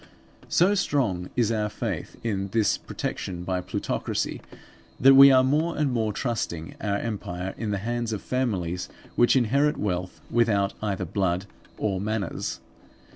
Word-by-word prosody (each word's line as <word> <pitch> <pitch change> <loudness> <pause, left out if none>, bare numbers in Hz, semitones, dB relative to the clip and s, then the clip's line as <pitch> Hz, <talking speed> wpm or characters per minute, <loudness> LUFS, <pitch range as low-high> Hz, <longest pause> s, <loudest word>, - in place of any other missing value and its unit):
So 185 +4 +4
strong 125 - 0
is 115 -3 +2
our 105 -1 0
faith - - -4
in 100 -4 -1
this 105 +1 +2
protection 90 -2 -5
by 90 0 -1
plutocracy, 90 - -2 0.6
that 135 +1 +8
we 135 +1 +10
are 130 -1 +6
more 155 +6 +1
and 150 -3 +1
more 110 -3 0
trusting 100 -9 -3
our 100 -1 0
empire 95 -4 -4
in 110 - -4
the 100 - 0
hands 120 -1 -1
of 105 - -4
families 90 -9 -1 0.3
which 120 - +4
inherit 140 +4 +2
wealth 90 -2 -3
without 105 -4 +2
either 100 -3 -2
blood 95 0 -1 0.3
or 95 -3 -1
manners. 105 -3 -3
105 Hz, 145 wpm, -26 LUFS, 95-125 Hz, 0.6 s, we